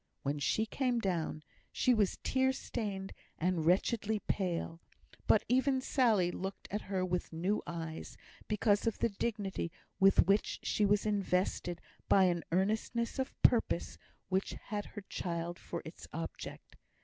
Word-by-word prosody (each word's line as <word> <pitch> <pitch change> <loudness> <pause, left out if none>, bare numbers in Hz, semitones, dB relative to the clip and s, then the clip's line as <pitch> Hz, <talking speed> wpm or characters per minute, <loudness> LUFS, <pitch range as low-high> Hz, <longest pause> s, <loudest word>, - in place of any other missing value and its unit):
When 145 +1 -1
she 215 +9 +1
came 250 +1 0
down, 170 -6 -1 0.3
she 255 - +3
was 210 -5 +2
tear 265 0 +2
stained 200 -7 -4 0.2
and 170 -2 0
wretchedly 210 +4 +2
pale; 175 -5 -2 0.5
but - - +5
even 260 +1 +3
Sally 225 -9 +3
looked 190 +2 -5
at 210 +2 -1
her 190 -2 -1
with 180 -1 -2
new 180 +6 0
eyes, 165 -2 -5 0.3
because 210 0 +2
of 225 - +1
the 235 - +2
dignity 200 -5 -2 0.3
with 195 -2 +6
which 200 +3 +2
she 210 - +2
was 205 +1 +3
invested 185 -4 0 0.3
by 195 - +6
an 175 -2 +2
earnestness 220 +7 0
of 265 - -3
purpose 225 -7 +3 0.3
which 190 +1 0 0.2
had 205 -1 -2
her 210 - -8
child 170 0 -3
for - - -5
its - - -9
object. - - -7
195 Hz, 145 wpm, -33 LUFS, 175-220 Hz, 0.5 s, with